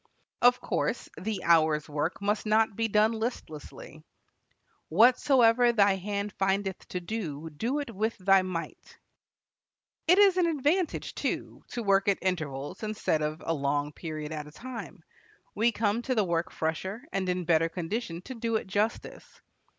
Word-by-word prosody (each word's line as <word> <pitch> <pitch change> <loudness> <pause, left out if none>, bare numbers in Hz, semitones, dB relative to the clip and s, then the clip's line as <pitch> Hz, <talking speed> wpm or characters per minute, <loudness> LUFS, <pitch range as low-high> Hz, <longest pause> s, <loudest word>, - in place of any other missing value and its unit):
Of 245 +1 +5
course, 230 - -2
the 205 -1 -4
hour's 155 -3 +3
work 150 +6 -3
must 210 +1 0
not 220 0 +3
be 225 +1 0
done 215 +1 +3
listlessly. 220 -9 -6 0.9
"Whatsoever 240 - +5
thy 200 -4 +4
hand 200 +1 -3
findeth 195 0 -1
to 180 - -4
do, 165 -6 -5
do 230 - -2
it 285 -6 -4
with 220 +3 -1
thy 195 0 +4
might." 180 -3 -6 1.1
It 360 +3 +6
is 395 -2 +6
an 355 -2 +3
advantage, 320 +3 0
too, - - -4
to 240 - -5
work 195 -1 +3
at 200 - +3
intervals 150 -7 -3
instead 215 -7 -1
of 155 +1 -3
a 165 - 0
long 145 0 -1
period 155 -2 -6
at 150 -1 -5
a - - -12
time. 230 -5 -8 0.5
We 230 +3 +2
come 220 +1 0
to 255 +1 -1
the 215 -3 +2
work 170 0 -1
fresher, 190 +8 -3
and 190 -1 -1
in 180 -1 -1
better 165 0 +3
condition 175 +1 -4
to 260 - -7
do 230 -1 -2
it 220 - -1
justice. 205 +4 -3
200 Hz, 160 wpm, -28 LUFS, 165-230 Hz, 1.1 s, It